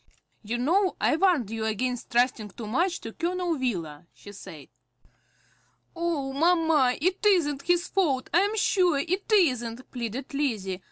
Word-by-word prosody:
"You 230 +3 -3
know 360 +10 +1
I - - +2
warned 320 - +2
you 225 -1 -3
against 245 +3 -2
trusting 240 -3 +1
too 230 - -6
much 340 - 0
to 225 - -8
Colonel 350 0 -1
Wheeler," 170 - -4
she 205 - -12
said. 160 -7 -11 1.3
"Oh, 330 -6 -2
mamma, 320 -4 +3
it 370 +6 -1
isn't 325 -9 +2
his 350 +3 +1
fault, 285 -10 0
I 345 - +6
am 410 +3 0
sure 365 -7 +2
it 370 +9 -2
isn't," 255 - +1
pleaded 250 +4 -5
Lizzie. 215 -10 -2
280 Hz, 150 wpm, -26 LUFS, 235-350 Hz, 1.3 s, I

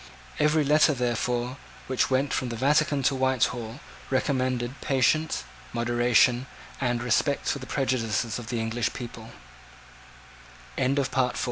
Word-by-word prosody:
Every 150 +1 +3
letter, 150 +1 +4
therefore, 125 +1 -1 0.3
which 130 -1 0
went 135 +1 +1
from 125 - -1
the 120 - -4
Vatican 145 +3 +2
to 135 - +3
Whitehall, 125 -2 0 0.3
recommended 130 -1 -1
patience, 155 +4 +1 0.3
moderation, 120 +1 +3 0.3
and 120 -2 0
respect 125 +4 +1
for 140 - 0
the 130 - -9
prejudices 120 -4 -1
of 120 - -9
the 120 -1 -2
English 115 +1 -1
p 125 - -5
125 Hz, 115 wpm, -26 LUFS, 120-135 Hz, 0.3 s, letter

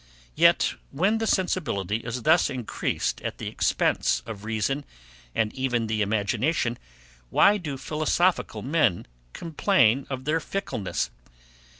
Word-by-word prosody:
Yet, - - +4 0.2
when 195 +10 +1
the 225 - -1
sensibility 150 - 0
is 115 +1 -5
thus 160 0 +4
increased 125 -5 -2
at - - -4
the - - -7
expense - - +1
of 105 -3 -8
reason, 115 +6 -1 0.5
and 110 -1 0
even 125 -3 0
the 110 -1 -1
imagination, 115 +5 0 0.5
why 205 - +5
do 150 -6 -5
philosophical 155 - 0
men 135 - +1 0.3
complain 140 - +2
of 130 -1 -5
their 155 +2 +1
fickleness? 155 - -3
130 Hz, 120 wpm, -26 LUFS, 110-165 Hz, 0.5 s, why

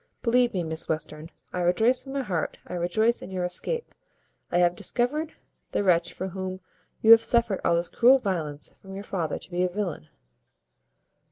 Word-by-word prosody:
Believe 245 0 +3
me, 180 - 0
Miss 160 0 -4
Western, 155 0 -4 0.2
I 180 - -2
rejoice 220 +9 +3
from 270 0 -8
my 275 -1 -1
heart, 175 -9 -2
I - - -8
rejoice 215 +7 +1
in - - -8
your 185 -1 -3
escape. 465 - -3 0.6
I 175 - +2
have 175 0 +3
discovered 295 - 0 0.4
the - - +1
wretch 170 -2 +3
for 190 +2 -5
whom 185 0 -5 0.4
you 225 - +7
have 230 0 +9
suffered 230 -3 +1
all 170 - +3
this 170 +1 0
cruel 255 +3 +5
violence 165 - -3
from 195 0 -10
your 200 - -6
father 170 -7 -2
to - - -10
be 175 +1 0
a 180 - +1
villain." 180 - -4
185 Hz, 185 wpm, -26 LUFS, 175-230 Hz, 0.6 s, have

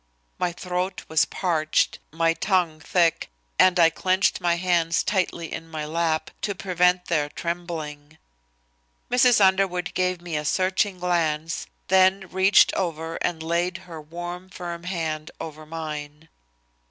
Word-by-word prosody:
My 180 -1 0
throat 180 +1 -3
was 160 -1 +3
parched, 160 -4 0
my 165 +1 +2
tongue 175 -4 0
thick, 165 +1 +1 0.3
and 185 -1 +5
I 165 -1 +6
clenched 185 +3 +1
my 175 -1 +2
hands 170 -2 +1
tightly 185 -3 -1
in 165 - -7
my 155 -2 -4
lap 160 0 -1
to 205 - -2
prevent 180 -1 +2
their 150 -3 0
trembling. 160 -3 -5 0.9
Mrs. 250 -1 +5
Underwood 190 -2 +2
gave 185 -1 0
me 175 -2 -5
a 150 - -1
searching 185 +4 +1
glance, 165 -3 -1 0.2
then 190 0 +4
reached 190 +2 +5
over 165 -2 -2
and 160 -2 -2
laid 170 +2 0
her 165 -3 -9
warm, 175 +4 -7
firm 175 -2 -7
hand 160 -4 -3
over 155 -1 -8
mine. 150 -1 -6
170 Hz, 135 wpm, -24 LUFS, 160-185 Hz, 0.9 s, I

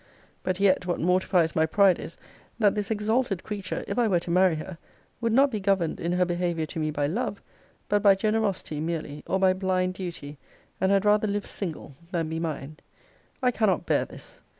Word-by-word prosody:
But 185 0 -2
yet, 190 -2 +3
what 175 - -1
mortifies 180 -1 +2
my 160 0 +3
pride 195 +1 +4
is, 165 - -8 0.4
that 210 -4 +4
this 210 0 -2
exalted 220 -2 0
creature, 200 -3 -4
if - - -2
I 235 - +3
were 180 -5 +2
to 170 - -4
marry 180 -1 +4
her, 165 +2 -7 0.4
would 230 -1 +1
not 270 +4 +4
be 215 - -2
governed 190 -4 0
in 170 - -2
her 180 0 +2
behaviour 175 -2 -1
to 160 +2 -6
me 155 -1 0
by 145 -1 -1
love, 205 - -2 0.5
but 205 0 +2
by 200 -1 +6
generosity 205 -6 -1
merely, 155 -2 -4
or 190 - +1
by 190 -1 +4
blind 185 -1 0
duty; 165 -6 -7 0.4
and 190 +1 +3
had 200 0 +3
rather 210 +1 +4
live 205 0 -2
single, 160 -7 -6 0.2
than 165 -3 -1
be 160 0 -3
mine. 155 -2 -4 0.7
I 250 - +4
cannot 210 -7 +1
bear - - +2
this. - - -13
185 Hz, 195 wpm, -26 LUFS, 165-205 Hz, 0.7 s, by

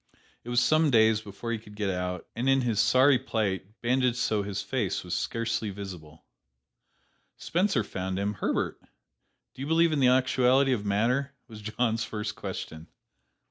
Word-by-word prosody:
It 120 - -9
was 120 0 +3
some 155 +4 +3
days 110 -3 +4
before 105 +3 -6
he 115 - -2
could 105 -1 -15
get 105 -2 -1
out, 90 -1 -4
and 125 +3 0
in 135 0 +4
his 115 -4 0
sorry 130 0 +5
plight, 105 -4 -3
bandaged 125 0 +2
so 110 -4 +1
his 100 0 -4
face 110 -8 -2
was 90 - -5
scarcely 115 -1 -2
visible, 90 -6 -9 1.1
Spencer 175 - 0
found 95 -1 -4
him. 100 +1 -1
"Herbert, 95 - -2 0.7
do - - -11
you 140 - -3
believe 165 +1 +3
in 150 - 0
the 130 - +5
actuality 130 +1 +3
of 110 -5 -2
matter?" 125 +7 0
was 110 -3 -11
John's 110 +2 -1
first 105 -2 -4
question. 80 +1 -7
115 Hz, 165 wpm, -28 LUFS, 100-130 Hz, 1.1 s, sorry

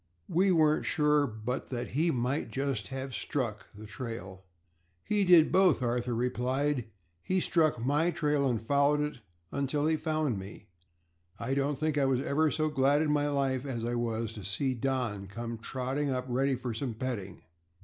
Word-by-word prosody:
We 190 +3 +3
weren't 155 -3 +3
sure 150 -1 +3
but 110 +3 -4
that 120 -2 -4
he 160 +6 +1
might 130 +1 -1
just 135 -7 -2
have 135 +2 -5
struck 115 -5 -3
the 105 +2 -11
trail." 105 -6 -7 0.6
"He 210 -1 +1
did 175 -4 +6
both," 185 -8 +4
Arthur 120 0 0
replied. 125 +2 0 0.4
"He 185 - 0
struck 160 -5 +2
my 145 +8 +2
trail 150 -5 +1
and 120 -3 0
followed 140 +5 +2
it 150 -3 -3 0.3
until 140 +1 0
he 160 0 +2
found 155 - -1
me. 100 +2 -10 0.7
I 120 +3 -2
don't 140 +1 0
think 155 0 0
I 140 - +3
was 135 -2 +2
ever 155 +2 +2
so 155 +2 0
glad 145 +1 +3
in 150 - +1
my 145 0 +2
life 135 -2 0
as 120 -5 -3
I 120 - -1
was 115 -2 -2
to 105 -3 -8
see 130 +8 -1
our 120 - -9
Don 120 -7 -1
come 115 +3 -6
trotting 130 +4 -2
up 130 -1 -1
ready 130 +2 +1
for 125 -1 -4
some 115 +1 -3
petting. 110 -6 -5
135 Hz, 180 wpm, -30 LUFS, 120-150 Hz, 0.7 s, did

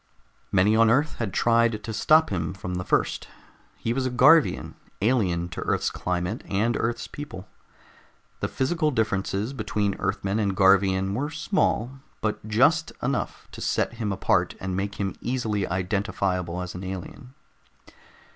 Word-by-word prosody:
Many 100 +3 +4
on 115 0 +5
Earth 145 +6 +2
had 110 -5 -2
tried 115 -1 +2
to 110 - -5
stop 155 +7 +4
him 85 -1 -2
from 90 -1 -5
the 90 0 -2
first. - - 0 0.5
He 115 - -2
was 130 0 0
a - - -1
Garvian, 140 +5 +4 0.3
alien 95 -7 +1
to - - -6
Earth's - - 0
climate 90 0 -2
and 110 +4 +1
Earth's 115 +2 -2
people. 145 -11 -8 0.9
The - - -1
physical 155 +3 0
differences 105 -1 -1
between 105 -4 -1
Earthmen 100 +3 -1
and 100 -3 0
Garvians 95 0 +4
were 145 +6 -1
small, 150 - 0 0.2
but 110 -1 -3
just 145 +10 +3
enough 135 +2 -2
to - - -9
set - - 0
him 115 -3 -3
apart 95 - +1
and 95 -1 -3
make 100 +2 -2
him 100 -1 -2
easily 115 -5 -1
identifiable 90 -2 -1
as 90 - -7
an 90 - -7
alien. 95 +7 -7
105 Hz, 150 wpm, -25 LUFS, 95-125 Hz, 0.9 s, on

